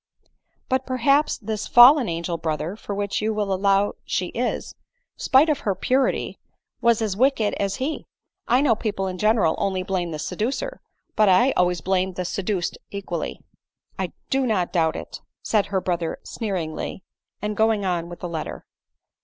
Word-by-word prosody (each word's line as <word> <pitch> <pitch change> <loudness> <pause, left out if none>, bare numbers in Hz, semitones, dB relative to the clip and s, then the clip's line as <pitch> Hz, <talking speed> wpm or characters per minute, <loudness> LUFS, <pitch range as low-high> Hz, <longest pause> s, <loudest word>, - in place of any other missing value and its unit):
" - - -57 0.2
But 260 0 0
perhaps 275 +4 +2
this 215 -1 -4
fallen 250 +1 +8
angel, 170 0 -3
brother, 160 +3 -2
for 205 -2 -6
such 200 0 -1
you 215 0 0
will 205 -2 0
allow 195 +1 +2
she 180 -1 -2
is, 245 +1 -3 0.4
spite 270 +4 +4
of 300 -3 +1
her 200 -8 -1
purity 260 +4 0
y - - -47 0.3
was 235 -1 +3
as 205 -4 -1
wicked 235 -2 +2
as 200 -1 0
he. 275 +4 -3 0.4
I 250 +3 +4
know 280 -5 +4
people 205 -3 -2
in 185 -1 -4
general 215 -6 +3
only 190 -2 0
blame 185 -2 -2
the 155 - -4
seducer, 245 - -3 0.3
but 215 -2 +4
I 240 +9 +5
always 180 -5 +1
blame 190 +1 0
the 180 0 -4
seduced 185 0 -2
equally." 200 -1 -5 0.3
" - - -31
I - - -4 0.2
do 265 -1 +2
not 190 -6 0
doubt 160 -3 +2
it," - - -7 0.2
said 210 -3 +1
her 195 -1 0
brother 175 -3 -2
sneeringly, 185 -5 -4 0.4
and 210 +1 -3
going 220 -1 +2
on 175 -2 -1
with 175 0 -10
the 180 - -3
letter. 160 -2 -5
200 Hz, 175 wpm, -23 LUFS, 180-235 Hz, 0.4 s, fallen